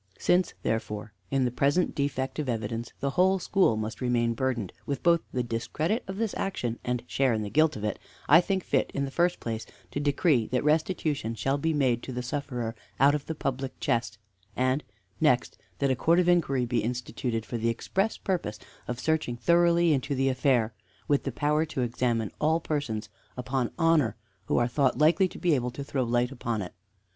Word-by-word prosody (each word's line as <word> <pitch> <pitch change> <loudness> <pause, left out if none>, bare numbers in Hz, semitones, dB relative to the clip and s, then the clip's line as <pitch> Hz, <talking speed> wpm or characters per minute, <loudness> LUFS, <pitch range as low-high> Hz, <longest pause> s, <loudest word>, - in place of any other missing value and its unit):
"Since, 180 +1 +2
therefore, 105 -1 -2 0.2
in 135 -2 +2
the 125 - 0
present 145 +8 +2
defect 135 0 -2
of 145 -4 -2
evidence 115 0 -3
the 140 - 0
whole 185 +5 +3
school 185 - +2
must 110 +3 -4
remain 120 -2 +1
burdened 120 -5 -2
with 140 -3 -3
both 170 -1 +4
the 125 - -1
discredit 155 - -1
of 190 0 -5
this 225 -2 -1
action 120 -12 -2
and 125 -1 -2
share 135 -1 +1
in 110 - -2
the 100 - -5
guilt 155 +1 +3
of 105 - -6
it, 105 -2 -2 0.3
I 165 +5 +8
think 190 0 -1
fit, - - +1
in 140 - 0
the 135 - -6
first 175 +4 +1
place, 115 -1 -4 0.3
to - - -2
decree 145 -4 +2
that 125 0 0
restitution 150 -5 0
shall 135 +5 0
be 160 +3 +1
made 130 -6 +2
to - - -7
the 125 0 -4
sufferer 125 -4 -3 0.3
out 140 +1 +6
of 150 -2 -3
the 160 - -3
public 135 -2 -3
chest, 115 -2 0 0.4
and, 130 +3 +1 0.4
next, 130 -6 +2 0.2
that 140 -1 +1
a - - +2
Court 165 +7 +3
of 180 -1 +3
Inquiry 145 -8 +3
be 120 -1 0
instituted 120 0 -3
for 120 - -4
the 115 +1 +1
express 195 - -1
purpose 170 - -2 0.3
of 125 0 -3
searching 155 -6 0
thoroughly 170 +3 +4
into 140 +1 -1
the 135 +1 +2
affair, 125 -4 +2 0.3
with 145 -1 +2
the 135 - -1
power 150 +4 +1
to 150 -4 -3
examine 120 -2 0
all 160 +2 +3
persons 140 -10 -3 0.3
upon 125 -1 -1
honor 165 -7 +3 0.3
who - - +1
are 120 - +3
thought 130 +1 +1
likely 165 +5 +4
to - - -11
be 175 -3 +2
able 125 -3 +1
to 130 +3 -6
throw 140 -1 -2
light 120 +1 +1
upon 115 -5 -2
it. 90 - -8
135 Hz, 200 wpm, -28 LUFS, 120-155 Hz, 0.4 s, I